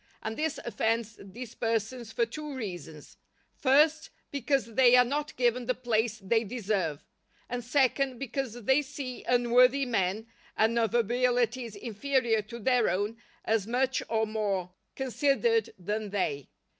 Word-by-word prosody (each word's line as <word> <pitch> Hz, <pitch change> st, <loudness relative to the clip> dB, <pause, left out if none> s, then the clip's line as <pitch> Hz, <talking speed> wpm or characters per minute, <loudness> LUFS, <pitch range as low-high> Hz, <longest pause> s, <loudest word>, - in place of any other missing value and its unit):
And 220 Hz, 0 st, -3 dB
this 310 Hz, +2 st, -1 dB
offends 225 Hz, 0 st, -1 dB
these 225 Hz, +4 st, -9 dB
persons 230 Hz, +1 st, -2 dB
for 235 Hz, -, +1 dB
two 295 Hz, +4 st, -7 dB
reasons: 175 Hz, -, -7 dB, 0.4 s
first, 305 Hz, +4 st, +3 dB, 0.2 s
because 270 Hz, -3 st, -1 dB
they 250 Hz, +1 st, +6 dB
are 250 Hz, 0 st, +7 dB
not 290 Hz, +4 st, -3 dB
given 245 Hz, -1 st, +1 dB
the 255 Hz, -, +1 dB
place 225 Hz, -3 st, 0 dB
they 225 Hz, +2 st, +1 dB
deserve; 195 Hz, -, -2 dB, 0.4 s
and 245 Hz, 0 st, -4 dB
second, 265 Hz, 0 st, +1 dB
because 245 Hz, -2 st, -4 dB
they 265 Hz, +5 st, +4 dB
see 270 Hz, -3 st, -7 dB
unworthy 250 Hz, +2 st, +4 dB
men 215 Hz, -2 st, 0 dB, 0.3 s
and 230 Hz, +2 st, +3 dB
of 225 Hz, -1 st, 0 dB
abilities 240 Hz, 0 st, +1 dB
inferior 230 Hz, +1 st, 0 dB
to 215 Hz, +3 st, -9 dB
their 245 Hz, 0 st, +2 dB
own, 205 Hz, +5 st, -1 dB, 0.3 s
as 220 Hz, -2 st, +1 dB
much 255 Hz, +2 st, +1 dB
or 220 Hz, -1 st, +1 dB
more 200 Hz, -4 st, -2 dB, 0.2 s
considered 285 Hz, -, +1 dB
than 210 Hz, +3 st, -3 dB
they. 145 Hz, -9 st, -2 dB
235 Hz, 140 wpm, -29 LUFS, 215-260 Hz, 0.4 s, are